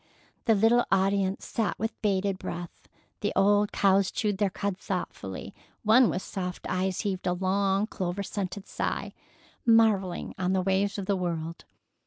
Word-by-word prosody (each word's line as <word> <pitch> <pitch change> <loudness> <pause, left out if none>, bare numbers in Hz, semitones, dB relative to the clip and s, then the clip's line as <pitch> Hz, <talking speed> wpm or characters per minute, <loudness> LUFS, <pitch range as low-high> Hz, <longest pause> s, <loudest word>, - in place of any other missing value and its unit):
The 225 - +5
little 225 +4 +4
audience 195 0 +1
sat 225 -2 -1
with 225 +1 -4
bated 195 -2 0
breath; 170 -1 -7 0.3
the 205 - -1
old 205 +1 +4
cows 195 -1 +3
chewed 205 -3 -1
their 205 -2 +3
cud 195 0 -3
thoughtfully, 170 - -5 0.3
one 230 +3 +6
with 185 - -2
soft 180 -2 -5
eyes 185 0 -1
heaved 190 -3 -2
a 180 - +2
long, 195 +2 +1
clover 190 -2 -3
scented 195 -1 -4
sigh, - - -3 0.5
marvelling 220 -6 +3
on 185 0 +1
the 190 -1 +1
ways 195 +2 +1
of 200 - -3
the 200 - +1
world. 170 -2 -3
195 Hz, 155 wpm, -28 LUFS, 185-205 Hz, 0.5 s, one